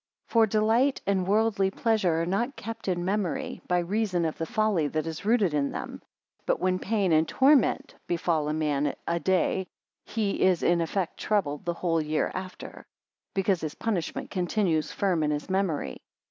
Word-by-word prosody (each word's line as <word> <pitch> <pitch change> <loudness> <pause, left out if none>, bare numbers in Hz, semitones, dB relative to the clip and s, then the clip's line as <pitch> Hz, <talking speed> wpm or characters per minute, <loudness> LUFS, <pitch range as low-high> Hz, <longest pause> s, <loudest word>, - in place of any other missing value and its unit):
36 - - -18
For 230 -1 +6
delight 225 +6 +2
and 190 -2 +1
worldly 205 -2 +2
pleasure 190 -6 +1
are - - -1
not 235 +10 -1
kept 225 0 -7
in 175 -2 0
memory, 195 -3 -2
by 180 - +2
reason 180 -1 0
of 160 - -2
the 165 - -2
folly 215 -9 +1
that 155 +1 -2
is 165 +3 -6
rooted 210 -7 +3
in 145 -1 +1
them. - - -6 0.5
But - - +1
when 185 0 +1
pain 200 -3 0
and 160 0 +4
torment 270 -2 +3
befall 165 -3 0
a - - 0
man 150 -2 0
a 170 0 0
day, 190 +1 +1 0.4
he 210 -3 -2
is 185 -2 +3
in 170 0 +3
effect 170 +2 -2
troubled 190 -7 -1
the 170 -1 -1
whole 165 -2 0
year 155 0 -1
after; 185 0 -8 0.5
because 195 -2 +1
his 155 -2 -4
punishment 200 -8 -3
continues 180 -3 0
firm 185 -5 0
in 150 - +1
his 150 +4 -3
memory. 170 - -1
185 Hz, 175 wpm, -27 LUFS, 165-210 Hz, 0.5 s, For